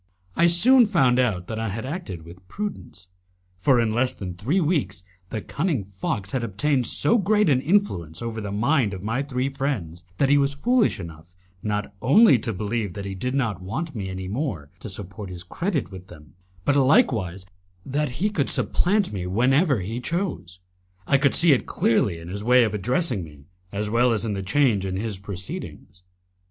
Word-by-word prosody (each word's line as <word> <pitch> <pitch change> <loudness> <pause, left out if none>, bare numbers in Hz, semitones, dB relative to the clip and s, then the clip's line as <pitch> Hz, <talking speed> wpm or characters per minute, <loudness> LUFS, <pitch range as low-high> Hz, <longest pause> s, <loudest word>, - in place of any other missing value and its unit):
I 170 - +4
soon 230 +8 +5
found 135 -11 +3
out 105 -8 +1
that 110 +2 -5
I 110 -1 -2
had 110 +5 -5
acted 135 - -6
with 90 +2 -14
prudence, 195 - -6 0.5
for 125 +6 +4
in 115 -2 +1
less 125 +2 +1
than 90 -3 -6
three 125 - 0
weeks 145 - -1 0.3
the 110 - -4
cunning 145 - -1
fox 95 +1 -4
had 130 -3 -1
obtained 125 +4 0
so 235 - +3
great 210 -3 +3
an 130 -2 +3
influence 130 - 0
over 115 -1 -4
the 100 -1 -5
mind 110 0 +1
of 95 - -9
my 115 +5 -1
three 130 -2 -2
friends 125 - -3
that 140 - +3
he 145 0 +5
was 140 0 +1
foolish 240 - +2
enough, 85 0 -10 0.3
not 105 -1 -3
only 140 - +6
to 115 - -2
believe 105 -1 -3
that 100 +1 -6
he 100 - -4
did 125 +8 -3
not 115 -8 -1
want 155 - -4
me 100 -5 -4
any 95 0 -5
more 95 - -4
to 110 - -7
support 95 0 -8
his 90 -1 -8
credit 150 - -2
with 95 -1 -10
them, 75 -3 -15 0.3
but 145 - +3
likewise 120 - +2 0.4
that 145 -1 -1
he 205 +5 0
could 145 -9 0
supplant 200 - +1
me 90 -2 -3
whenever 130 - +2
he 115 +7 -4
chose. 170 - -3 0.5
I 140 - +3
could 140 0 +3
see 170 -1 +6
it 130 - 0
clearly 105 -6 +1
in 80 0 -10
his 100 +3 -4
way 125 +2 +5
of 110 -3 -1
addressing 120 - 0
me, 75 -3 -13 0.3
as 105 +1 -2
well 120 +2 +3
as 110 0 0
in 110 - -1
the 100 - -3
change 110 0 +2
in 95 -1 -3
his 105 -2 -3
proceedings. 95 -1 -7
115 Hz, 190 wpm, -24 LUFS, 95-145 Hz, 0.5 s, only